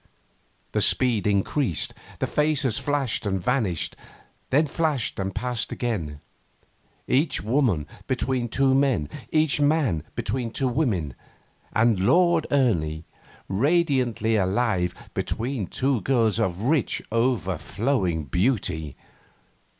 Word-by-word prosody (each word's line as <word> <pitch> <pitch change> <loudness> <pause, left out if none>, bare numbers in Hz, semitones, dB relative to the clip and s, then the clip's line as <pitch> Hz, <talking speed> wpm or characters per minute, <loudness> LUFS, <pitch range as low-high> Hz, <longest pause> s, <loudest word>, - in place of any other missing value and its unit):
The - - 0
speed 120 -5 +3
increased; 100 - +1 0.2
the - - -1
faces 145 -6 +1
flashed 145 -5 -1
and 95 -1 0
vanished, 100 - 0 0.5
then 150 +4 +3
flashed 150 -7 -1
and 95 -1 -3
passed 125 -3 -2
again; 85 - -3 0.9
each 140 - +1
woman 110 - +1 0.2
between 130 -2 -1
two 135 +2 +2
men, 130 - +2 0.2
each 155 -2 +2
man 145 - +2
between 125 -3 -2
two 130 +3 -1
women, 110 - 0 0.6
and 110 -3 +3
Lord 170 - +3
Ernie, 85 - +1 0.4
radiantly 125 - +1
alive, 95 -2 0 0.2
between 115 -4 -2
two 130 +1 0
girls 115 -3 +2
of 95 +2 -1
rich, 140 +1 +1
o'erflowing 105 - 0
beauty. 80 - -1
120 Hz, 105 wpm, -25 LUFS, 95-135 Hz, 0.9 s, speed